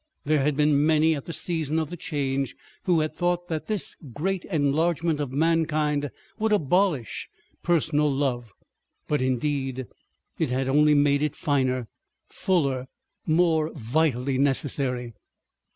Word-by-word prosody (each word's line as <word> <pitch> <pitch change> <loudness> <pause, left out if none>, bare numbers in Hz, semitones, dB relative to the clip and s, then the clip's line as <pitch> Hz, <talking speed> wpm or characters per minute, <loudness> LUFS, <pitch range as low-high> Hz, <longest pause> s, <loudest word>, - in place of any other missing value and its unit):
There 155 0 +2
had 145 0 +1
been 150 -1 +3
many 160 +1 +4
at 140 - -6
the - - -5
season 160 -3 -1
of 160 -1 -1
the - - -4
Change 140 -6 -2 0.3
who 175 -4 +3
had 155 - -2
thought 175 0 -1
that 155 -2 -3
this 215 -4 -2 0.2
great 185 +6 -2
enlargement 160 0 +1
of 145 -4 -3
mankind 150 -1 +1 0.3
would 220 0 +1
abolish 180 - +1 0.3
personal 150 -3 +2
love; 125 -5 -1 0.6
but 150 -2 0
indeed 130 0 -1 0.5
it - - +1
had 130 +1 -1
only 150 +2 +4
made 145 0 +3
it 150 -2 -1
finer, 130 -6 0 0.4
fuller, 140 -9 0 0.4
more 160 -1 +2
vitally 130 0 0
necessary. 130 -3 0
150 Hz, 135 wpm, -25 LUFS, 135-160 Hz, 0.6 s, many